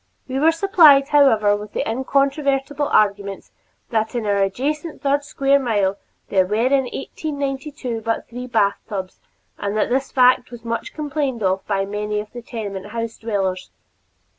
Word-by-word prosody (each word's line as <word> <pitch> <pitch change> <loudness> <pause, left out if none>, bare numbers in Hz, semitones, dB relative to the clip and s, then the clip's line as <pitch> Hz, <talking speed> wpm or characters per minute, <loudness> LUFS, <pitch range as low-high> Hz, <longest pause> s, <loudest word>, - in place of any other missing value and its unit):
We 265 0 -2
were 320 +3 +5
supplied, 325 -6 +5
however, 225 -9 +4
with 210 0 -8
the - - -2
incontrovertible 275 +3 0
argument 200 -2 0 0.4
that 220 +1 0
in 235 -3 -2
our 205 -1 +1
adjacent 290 - -2
third 285 +1 +1
square 280 -1 +2
mile 205 -6 0 0.3
there 190 -2 +3
were 210 - -1
in 260 +4 +2
1892 275 -3 -4
but 225 +1 -2
three 250 +2 -7
bathtubs 200 -3 -1 0.4
and 205 +1 -2
that 215 - +1
this 265 +2 0
fact 250 -1 +4
was 240 -1 -11
much 230 0 -4
complained 285 -6 -2
of 190 0 +1
by 195 -2 0
many 210 +1 -3
of 210 0 -7
the 240 - -7
tenement 205 -4 -6
house 230 +1 -5
dwellers. 195 -5 -2
235 Hz, 155 wpm, -21 LUFS, 210-275 Hz, 0.4 s, were